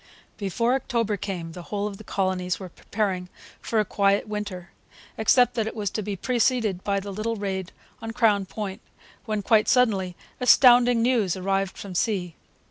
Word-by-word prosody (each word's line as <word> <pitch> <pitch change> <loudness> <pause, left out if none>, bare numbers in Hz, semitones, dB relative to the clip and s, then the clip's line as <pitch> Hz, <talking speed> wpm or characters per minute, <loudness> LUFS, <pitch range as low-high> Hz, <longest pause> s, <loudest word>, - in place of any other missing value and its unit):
] - - -32
Before 230 +4 0
October 235 -5 0
came 180 -5 -5
the 175 - -8
whole 200 +3 -3
of 205 -2 -5
the - - -10
colonies 185 -3 -1
were 190 -2 -7
preparing 185 -1 -3 0.3
for 225 - 0
a 210 - +2
quiet 200 +1 +1
winter, 205 -4 -5 0.4
except 245 +3 +4
that 225 -2 -1
it 220 - -5
was 205 -3 -2
to 215 - -2
be 205 0 -4
preceded 230 -3 0
by 200 -1 0
the 200 0 -7
little 220 +3 -2
raid 190 -3 -4 0.3
on 225 - -5
Crown 220 -4 +2
Point, 200 +1 -5 0.4
when, 215 -3 -2
quite 215 +1 +4
suddenly, 200 -8 +2 0.2
astounding 245 -2 +6
news 230 -8 +2
arrived 195 0 -1
from 195 -2 -7
sea. 180 -2 -1
205 Hz, 175 wpm, -25 LUFS, 190-225 Hz, 0.4 s, astounding